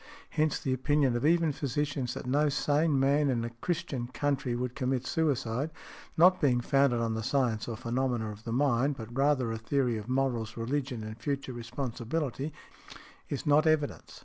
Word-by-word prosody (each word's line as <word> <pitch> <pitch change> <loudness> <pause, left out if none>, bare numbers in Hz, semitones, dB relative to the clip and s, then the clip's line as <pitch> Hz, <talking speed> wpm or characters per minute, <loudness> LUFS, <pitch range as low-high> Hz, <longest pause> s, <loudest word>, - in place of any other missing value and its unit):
Hence 155 -1 +1
the 130 - -1
opinion 135 0 +2
of 120 +5 +1
even 165 -1 +3
physicians 140 -2 -2
that - - -6
no 145 +4 +2
sane 145 +1 +2
man 140 +2 +3
in 120 -3 0
a 120 - -5
Christian 140 -1 -3
country 135 -1 -1
would 125 0 -2
commit 130 -2 -1
suicide, 140 -3 0 0.5
not 180 +3 +6
being 130 -5 +3
founded 135 -1 +2
on 115 -1 0
the 110 - -2
science 120 -2 0
or 115 -2 -4
phenomena 120 -2 -1
of 105 +1 -11
the 115 - -5
mind, 135 +2 +2
but 115 +1 -8
rather 135 -3 +2
a 115 - -3
theory 120 0 0
of 105 +3 -9
morals, 125 -4 -1
religion 125 0 -2
and 110 +1 -7
future 140 0 -2
responsibility, 125 +4 -3 0.8
is 140 - -3
not 150 +1 +4
evidence. 155 -2 0
130 Hz, 175 wpm, -30 LUFS, 120-145 Hz, 0.8 s, not